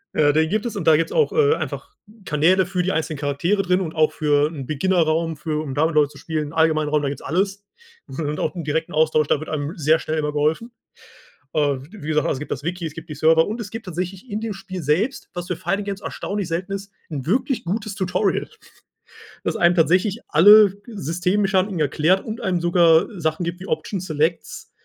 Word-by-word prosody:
Äh, 145 Hz, -1 st, +4 dB
den 160 Hz, +2 st, +2 dB
gibt 215 Hz, +2 st, -1 dB
es 235 Hz, -, -4 dB
und 165 Hz, -, -4 dB
da 160 Hz, -, +7 dB
gibt's 165 Hz, +2 st, 0 dB
auch, 460 Hz, -, +2 dB
äh, 450 Hz, -1 st, +4 dB
einfach 415 Hz, -, -6 dB, 0.3 s
Kanäle 175 Hz, +4 st, +3 dB
für 180 Hz, 0 st, -2 dB
die 190 Hz, -, 0 dB
einzelnen 155 Hz, -2 st, -2 dB
Charaktere 150 Hz, +8 st, 0 dB
drin 180 Hz, +1 st, +1 dB
und 165 Hz, -4 st, -4 dB
auch 155 Hz, -1 st, +2 dB
für 145 Hz, -1 st, +2 dB
'n 145 Hz, -5 st, -7 dB
Beginner-Raum 165 Hz, +1 st, +1 dB
für 150 Hz, 0 st, -3 dB
um 135 Hz, -4 st, -5 dB
da 155 Hz, +2 st, +3 dB
mit 160 Hz, -, -1 dB
Leuten 150 Hz, -2 st, +4 dB
zu -, -, -15 dB
spielen, 155 Hz, -2 st, -3 dB
'n -, -, -12 dB
allgemeinen 160 Hz, -2 st, +2 dB
Raum, 150 Hz, 0 st, +1 dB
da 140 Hz, -, -1 dB
gibt's 140 Hz, -, -6 dB
alles. 195 Hz, +4 st, -1 dB, 0.4 s
Und 150 Hz, +2 st, -4 dB
auch -, -, -2 dB
'n 170 Hz, -, -4 dB
direkten 155 Hz, +2 st, -2 dB
Austausch, 155 Hz, -1 st, +2 dB
da 145 Hz, -, +2 dB
wird 155 Hz, -, -7 dB
einem 150 Hz, 0 st, -4 dB
sehr 155 Hz, +1 st, +3 dB
schnell 155 Hz, -, -3 dB
immer 150 Hz, -1 st, -1 dB
geholfen. 155 Hz, +11 st, 0 dB, 0.8 s
Äh, 145 Hz, -2 st, +1 dB
wie 200 Hz, -7 st, -10 dB
gesagt, 150 Hz, -1 st, +1 dB
also, -, -, 0 dB
es -, -, -6 dB
gibt 150 Hz, -, -6 dB
das 140 Hz, -, -4 dB
Wiki, 170 Hz, +1 st, -3 dB
es 155 Hz, -, -7 dB
gibt 165 Hz, -1 st, -10 dB
die -, -, -4 dB
Server 160 Hz, +2 st, +4 dB
und 225 Hz, +3 st, -4 dB
es 205 Hz, -, -6 dB
gibt 225 Hz, 0 st, -7 dB
tatsächlich 185 Hz, +6 st, -5 dB
in 205 Hz, +1 st, -2 dB
dem 220 Hz, -2 st, -4 dB
Spiel 190 Hz, -2 st, -7 dB
selbst, 185 Hz, -, 0 dB
was 175 Hz, 0 st, -5 dB
für 180 Hz, -, -3 dB
Fighting-Games 200 Hz, +1 st, -3 dB
erstaunlich 200 Hz, -2 st, -4 dB
selten 180 Hz, +4 st, -3 dB
ist, 195 Hz, 0 st, -5 dB, 0.2 s
'n 140 Hz, -4 st, -5 dB
wirklich 250 Hz, -, 0 dB
gutes 205 Hz, +3 st, -3 dB
Tutorial. 190 Hz, +1 st, 0 dB, 1.0 s
Dass -, -, -1 dB
einem 175 Hz, 0 st, +4 dB
tatsächlich 185 Hz, +7 st, +2 dB
alle 205 Hz, +5 st, +7 dB
Systemmechaniken 190 Hz, -, 0 dB
erklärt 155 Hz, +6 st, +2 dB
und 220 Hz, 0 st, -6 dB
einem 180 Hz, -3 st, -1 dB
sogar 170 Hz, -2 st, +4 dB
Sachen 160 Hz, +1 st, -1 dB
gibt 170 Hz, +1 st, -4 dB
wie 190 Hz, -, -9 dB
Options, 180 Hz, +4 st, -3 dB
Selects, 160 Hz, +1 st, -2 dB
165 Hz, 215 wpm, -22 LUFS, 155-195 Hz, 1.0 s, da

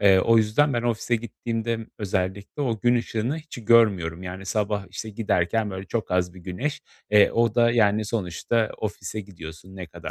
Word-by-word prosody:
Eee, 100 Hz, -2 st, +6 dB
o 115 Hz, +4 st, +4 dB
yüzden 110 Hz, +7 st, +3 dB
ben 120 Hz, -1 st, 0 dB
ofise 120 Hz, 0 st, 0 dB
gittiğimde 115 Hz, 0 st, -3 dB, 0.2 s
özellikle, 100 Hz, +6 st, -2 dB
o 115 Hz, -5 st, -1 dB
gün 120 Hz, 0 st, +4 dB
ışığını 120 Hz, +5 st, -2 dB
hiç 150 Hz, -7 st, -10 dB
görmüyorum, 95 Hz, -7 st, +4 dB
yani, 95 Hz, +1 st, -7 dB
sabah, 105 Hz, -1 st, -1 dB
işte, 110 Hz, +4 st, -6 dB
giderken, 105 Hz, 0 st, 0 dB
böyle, 95 Hz, 0 st, -6 dB
çok 115 Hz, -4 st, -3 dB
az 90 Hz, 0 st, 0 dB
bir 90 Hz, -, -12 dB
güneş, 125 Hz, -, -3 dB, 0.3 s
eee, 105 Hz, -1 st, +6 dB
o 115 Hz, -2 st, +2 dB
da, 120 Hz, 0 st, +4 dB
yani, 110 Hz, -2 st, +3 dB
sonuçta 110 Hz, +2 st, -1 dB
ofise 105 Hz, 0 st, -4 dB
gidiyorsun, 90 Hz, -1 st, -11 dB
ne 90 Hz, -2 st, -6 dB
kadar 80 Hz, -, -8 dB
105 Hz, 180 wpm, -25 LUFS, 95-115 Hz, 0.3 s, Eee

